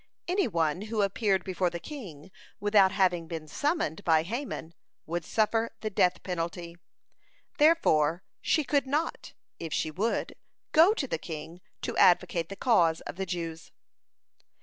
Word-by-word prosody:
Any 370 Hz, +2 st, +1 dB
one 165 Hz, -2 st, 0 dB
who 215 Hz, -2 st, +1 dB
appeared 195 Hz, -1 st, +1 dB
before 185 Hz, -1 st, 0 dB
the 170 Hz, 0 st, -6 dB
king 185 Hz, -, -9 dB, 0.3 s
without 205 Hz, -2 st, +4 dB
having 180 Hz, -3 st, +1 dB
been 160 Hz, -1 st, -6 dB
summoned 285 Hz, -, -1 dB
by 160 Hz, -2 st, +4 dB
Haman, 210 Hz, -, -5 dB, 0.3 s
would 170 Hz, +2 st, -3 dB
suffer 225 Hz, +1 st, 0 dB
the 215 Hz, -1 st, -3 dB
death 180 Hz, -2 st, +2 dB
penalty. 170 Hz, -1 st, -4 dB, 0.8 s
Therefore, 180 Hz, -, +4 dB, 0.2 s
she 310 Hz, -, +2 dB
could 280 Hz, -1 st, +1 dB
not, 300 Hz, +5 st, -2 dB, 0.3 s
if 165 Hz, -2 st, -6 dB
she 155 Hz, -, -1 dB
would, 210 Hz, +9 st, -1 dB, 0.4 s
go 340 Hz, +7 st, +6 dB
to 295 Hz, -, -1 dB
the 165 Hz, -, -2 dB
king 160 Hz, +2 st, -8 dB, 0.2 s
to -, -, -3 dB
advocate 170 Hz, -2 st, +3 dB
the 195 Hz, -, -6 dB
cause 175 Hz, -9 st, +3 dB
of -, -, -7 dB
the 190 Hz, +1 st, -4 dB
Jews. 165 Hz, -2 st, -5 dB
185 Hz, 150 wpm, -28 LUFS, 165-225 Hz, 0.8 s, go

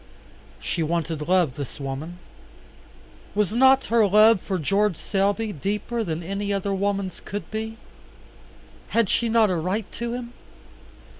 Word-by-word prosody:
She 170 Hz, -, -2 dB
wanted 160 Hz, -1 st, -2 dB
love, 180 Hz, -7 st, +3 dB
this 140 Hz, 0 st, -7 dB
woman. 140 Hz, +5 st, -5 dB, 1.2 s
Was 210 Hz, -1 st, +1 dB
not 265 Hz, +2 st, +5 dB
her 225 Hz, -2 st, +3 dB
love 215 Hz, 0 st, +6 dB
for 190 Hz, -, -2 dB
George 195 Hz, +3 st, +1 dB
Selby 205 Hz, +2 st, 0 dB
deeper 210 Hz, -, -2 dB
than 165 Hz, -3 st, -3 dB
any 200 Hz, +3 st, -3 dB
other 200 Hz, 0 st, -1 dB
woman's 195 Hz, -1 st, -1 dB
could 200 Hz, -4 st, -6 dB
be? 220 Hz, +1 st, -4 dB, 1.1 s
Had 230 Hz, -4 st, +1 dB
she 235 Hz, -, +1 dB
not 220 Hz, -3 st, +4 dB
a -, -, +1 dB
right 185 Hz, +6 st, -1 dB
to 235 Hz, 0 st, -4 dB
him? 245 Hz, -1 st, -6 dB
200 Hz, 140 wpm, -24 LUFS, 175-220 Hz, 1.2 s, love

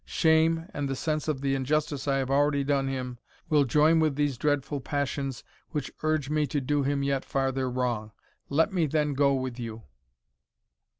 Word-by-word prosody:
Shame, 160 Hz, 0 st, +2 dB
and 145 Hz, -2 st, -2 dB
the 135 Hz, -, -1 dB
sense 155 Hz, +2 st, -2 dB
of 145 Hz, -4 st, -1 dB
the 135 Hz, -1 st, +1 dB
injustice 145 Hz, +1 st, -1 dB
I 140 Hz, -, +2 dB
have 135 Hz, 0 st, -1 dB
already 140 Hz, 0 st, +3 dB
done 140 Hz, -1 st, +1 dB
him, 125 Hz, -2 st, -4 dB, 0.3 s
will 150 Hz, -3 st, +4 dB
join 150 Hz, +5 st, +4 dB
with 155 Hz, -3 st, +2 dB
these 145 Hz, -2 st, 0 dB
dreadful 145 Hz, +1 st, -1 dB
passions 140 Hz, -2 st, -2 dB, 0.3 s
which 145 Hz, -4 st, -3 dB
urge 155 Hz, -3 st, 0 dB
me 150 Hz, 0 st, +1 dB
to 145 Hz, -, -1 dB
do 145 Hz, +2 st, 0 dB
him 140 Hz, 0 st, 0 dB
yet 140 Hz, -1 st, 0 dB
farther 135 Hz, -1 st, -1 dB
wrong. 120 Hz, -4 st, -2 dB, 0.4 s
Let 160 Hz, +7 st, +2 dB
me 170 Hz, -4 st, +2 dB
then 150 Hz, 0 st, 0 dB
go 140 Hz, 0 st, +3 dB
with 130 Hz, -2 st, -3 dB
you." 115 Hz, -1 st, -6 dB
140 Hz, 180 wpm, -28 LUFS, 135-150 Hz, 0.4 s, will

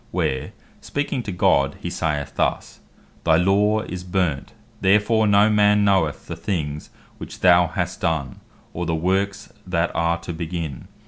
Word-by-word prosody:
where 65 Hz, -1 st, -2 dB, 0.3 s
speaking 145 Hz, -2 st, -2 dB
to 105 Hz, -, -5 dB
God, 70 Hz, -6 st, +2 dB
he -, -, -5 dB
saith 75 Hz, -3 st, -2 dB
thus, -, -, -2 dB, 0.4 s
"Thy 80 Hz, -, +4 dB
law 100 Hz, +5 st, +3 dB
is 90 Hz, -4 st, -6 dB
burnt; 90 Hz, -6 st, -1 dB, 0.3 s
therefore 105 Hz, +3 st, +3 dB
no 100 Hz, +1 st, +5 dB
man 105 Hz, -1 st, +4 dB
knoweth 95 Hz, -7 st, +1 dB
the -, -, -6 dB
things 75 Hz, -6 st, -4 dB, 0.3 s
which -, -, -9 dB
thou 90 Hz, -1 st, +5 dB
has 90 Hz, 0 st, -3 dB
done, 80 Hz, -6 st, -2 dB, 0.3 s
or 85 Hz, 0 st, -4 dB
the 80 Hz, -, 0 dB
works 100 Hz, +6 st, -1 dB
that 85 Hz, -1 st, 0 dB
are 85 Hz, 0 st, +1 dB
to 85 Hz, -, -6 dB
begin. 80 Hz, -4 st, -5 dB
90 Hz, 150 wpm, -22 LUFS, 80-100 Hz, 0.4 s, no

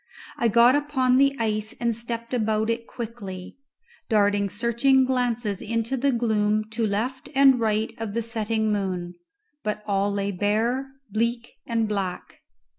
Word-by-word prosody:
I 235 Hz, -, +1 dB
got 235 Hz, +3 st, +6 dB
upon 265 Hz, -3 st, +2 dB
the 275 Hz, 0 st, +4 dB
ice 215 Hz, -1 st, -1 dB
and 235 Hz, -1 st, 0 dB
stepped 235 Hz, +1 st, -4 dB
about 220 Hz, -1 st, +1 dB
it 230 Hz, 0 st, -4 dB
quickly, 215 Hz, -3 st, -7 dB, 0.5 s
darting 205 Hz, -2 st, +2 dB
searching 235 Hz, +5 st, +2 dB
glances 240 Hz, -5 st, -1 dB
into 230 Hz, +3 st, -1 dB
the 275 Hz, +2 st, +1 dB
gloom 215 Hz, -3 st, +1 dB
to 225 Hz, -1 st, 0 dB
left 235 Hz, +6 st, -3 dB
and 270 Hz, -2 st, +6 dB
right 220 Hz, -1 st, 0 dB
of 225 Hz, -2 st, -4 dB
the 230 Hz, -, 0 dB
setting 220 Hz, -1 st, -1 dB
moon; 185 Hz, -3 st, -2 dB, 0.5 s
but 210 Hz, 0 st, -3 dB
all 200 Hz, 0 st, +1 dB
lay 200 Hz, 0 st, -1 dB
bare, 220 Hz, +7 st, 0 dB, 0.2 s
bleak, 235 Hz, +2 st, -1 dB, 0.2 s
and 230 Hz, -2 st, 0 dB
black. 195 Hz, -4 st, -4 dB
225 Hz, 145 wpm, -25 LUFS, 210-240 Hz, 0.5 s, got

